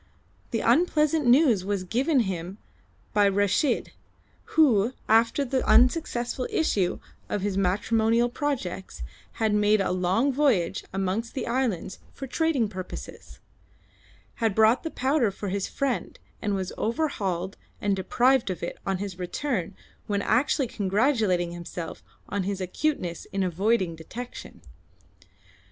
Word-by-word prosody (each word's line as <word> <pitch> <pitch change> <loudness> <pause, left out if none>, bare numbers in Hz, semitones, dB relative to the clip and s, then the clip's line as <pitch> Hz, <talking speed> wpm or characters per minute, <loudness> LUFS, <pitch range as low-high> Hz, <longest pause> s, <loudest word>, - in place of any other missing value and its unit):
The - - -1
unpleasant 310 -3 +3
news 245 - +5
was 195 -1 -2
given 255 - +2
him 185 -2 -4 0.6
by 205 -1 +4
Reshid, 205 - +1 0.7
who, 245 -7 +4
after 230 +5 +3
the 260 0 0
unsuccessful 245 +1 +2
issue 195 - +1 0.3
of 205 - -2
his 200 -2 -1
matrimonial 220 +5 +2
projects, 240 - -4 0.3
had 220 -2 0
made 210 0 +3
a 195 - 0
long 185 +9 +1
voyage 250 - +1
amongst 195 +4 -2
the 265 - -2
islands 235 -8 -1
for 270 - -6
trading 275 -3 +1
purposes; 185 -3 -9 1.0
had 220 -3 +1
bought 220 +3 +5
the 325 - -4
powder 265 -4 +1
for 200 +1 -5
his 195 0 -2
friend, 275 -3 -2 0.2
and 205 -2 0
was 190 -1 -3
overhauled 205 - -1 0.2
and 200 -1 +1
deprived 240 +4 +2
of 180 -2 -4
it 170 - -5
on 195 -1 +1
his 190 -1 -6
return 190 - -2 0.3
when 200 -1 0
actually 265 +4 +2
congratulating 205 -4 +1
himself 170 -1 -7 0.3
on 200 - -2
his 195 +1 -2
acuteness 185 - -2
in 195 0 0
avoiding 185 0 +1
detection. 235 +10 -9
210 Hz, 130 wpm, -26 LUFS, 190-255 Hz, 1.0 s, news